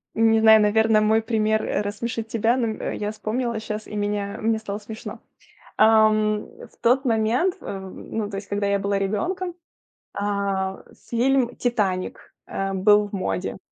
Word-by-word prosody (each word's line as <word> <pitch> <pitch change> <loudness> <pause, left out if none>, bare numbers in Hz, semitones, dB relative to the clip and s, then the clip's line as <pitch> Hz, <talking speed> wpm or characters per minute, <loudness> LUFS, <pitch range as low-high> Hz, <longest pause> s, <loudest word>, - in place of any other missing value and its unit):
не 225 0 +4
знаю, 220 0 +7
наверно, 215 +1 +3
мой 220 +1 +3
пример, 220 -1 +1
э, - - -1
рассмешит 220 +2 -4
тебя. 230 +2 +1
Но, 240 -3 0
м, 220 - -3
я 210 0 -3
вспомнила 230 +2 -2
щас, 215 0 -5
и - - -8
меня 205 -1 -2
мне 220 0 +1
стало 205 -1 -5
смешно. 220 +1 -8 0.6
Ам, 215 -1 +4 0.3
в - - -26
тот 255 +4 +3
момент, 235 +9 +1
э, 195 - -6
ну, 205 +2 -6
то 200 - -5
есть 195 0 -7
когда 200 0 -1
я 200 0 +2
была 200 0 0
ребенком, 345 - -2 0.6
а, 200 -2 -2 0.3
фильм 245 +1 +1
"Титаник", 200 -7 -2
э, 195 0 -3
был 205 +2 +4
в - - -20
моде. 95 - -3
215 Hz, 160 wpm, -23 LUFS, 205-225 Hz, 0.6 s, знаю